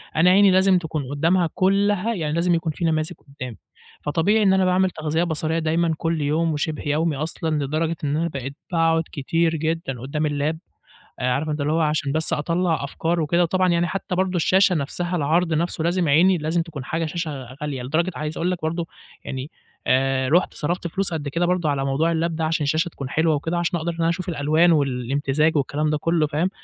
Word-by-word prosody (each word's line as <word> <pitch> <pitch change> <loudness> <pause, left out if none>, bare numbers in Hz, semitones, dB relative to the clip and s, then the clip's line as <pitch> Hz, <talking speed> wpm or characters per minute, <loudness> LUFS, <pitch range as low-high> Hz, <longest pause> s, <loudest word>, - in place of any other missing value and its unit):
أنا 170 +3 +5
عيني 195 +1 +6
لازم 190 0 +4
تكون 155 -5 -3
قدامها 165 +4 +2
كلها 200 +3 +2
يعني 155 -6 -2
لازم 170 +1 +2
يكون 165 -1 -1
في 170 - -3
نماذج 155 -1 0
قدامي، 125 -5 -9 0.4
فطبيعي 185 +9 +2
إن 190 -1 +4
أنا 190 -1 +3
باعمل 185 +1 +3
تغذية 160 +1 -1
بصرية 160 0 -1
دايمًا 165 +1 +1
كل 165 -2 -1
يوم 155 +3 +1
وشبه 150 +1 -3
يومي 155 +1 +1
أصلًا 155 0 -2
لدرجة 160 +3 -1
إن 145 +1 0
أنا 170 +1 0
بقيت 135 -1 -6 0.2
باقعد 165 -1 +2
كتير 165 +4 0
جدًا 160 -5 -2
قدام 150 +4 -2
اللاب. 150 +2 -1 0.6
آآ 125 0 +1
عارف 145 +5 -1
أنت 150 -1 -2
اللي 145 +2 0
هو 165 - +1
عشان 150 -2 0
بس 160 +1 -1
أطلّع 165 0 0
أفكار 165 +4 -1
وكده، 170 +3 +2
وطبعا 185 +2 +2
يعني 170 0 +2
حتى 190 -1 -3
برضه 185 0 0
الشاشة 185 +2 +4
نفسها 175 +4 -2
العرض 165 +3 +1
نفسه 165 0 -1
لازم 175 -2 +1
عيني 175 +5 +4
لازم 160 +2 0
تكون 150 -6 -8
حاجة 165 +3 -2
شاشة 145 -6 -5
غالية، 140 -4 -3
لدرجة 160 +8 0
عايز 150 +1 -4
أقول 175 +2 0
لك 180 - -2
برضه 165 +1 -2 0.4
يعني 130 +3 -5 0.4
آآ 130 0 +2
رُحت 175 +6 +2
صرفت 175 +3 -2
فلوس 190 +1 -2
قد 150 -3 -3
كده 170 +5 0
برضه 175 -4 +1
على 135 -1 -1
موضوع 150 +5 +1
اللاب 165 0 -1
ده 160 - -1
عشان 155 -1 0
الشاشة 155 +4 +1
تكون 140 -5 -7
حلوة 160 0 +2
وكده 165 +4 -2
عشان 175 +1 0
أقدر 165 +1 -3
أنا 165 - +2
أشوف 185 +2 -2
الألوان 160 +2 +3
والإمتزاج 140 +2 +1
والكلام 150 +2 0
ده 150 - 0
كله 165 -1 +1
فاهم. 155 +5 0
160 Hz, 205 wpm, -23 LUFS, 150-175 Hz, 0.6 s, عيني